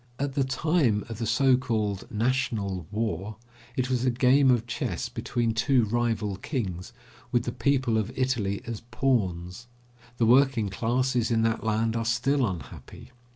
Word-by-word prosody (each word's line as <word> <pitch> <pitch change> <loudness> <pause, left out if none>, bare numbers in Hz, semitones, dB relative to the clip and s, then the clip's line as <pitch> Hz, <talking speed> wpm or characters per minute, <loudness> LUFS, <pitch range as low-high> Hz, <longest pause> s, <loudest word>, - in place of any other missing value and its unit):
At 140 0 -2
the 140 -1 +1
time 130 -4 +1
of 115 -1 -6
the 115 - -2
so 130 +4 +4
called 110 -6 -2
national 110 - -1
war, 105 -1 -3 0.4
it 130 0 +1
was 130 -1 0
a 130 - +3
game 130 +3 +4
of 120 -2 +3
chess 120 - -3
between 120 -2 -1
two 120 +2 +3
rival 110 -3 -1
kings, 95 - -4 0.4
with 120 -1 +2
the 120 - -3
people 125 -2 +1
of 110 +2 -3
Italy 115 -7 -1
as 115 -2 -5
pawns. 110 -6 -1 0.5
The 115 - +2
working 125 -3 +4
classes 120 +4 0
in 115 -1 +2
that 115 0 0
land 110 +1 0
are 115 - 0
still 130 +4 +1
unhappy. 90 +6 -9
115 Hz, 155 wpm, -27 LUFS, 105-130 Hz, 0.5 s, so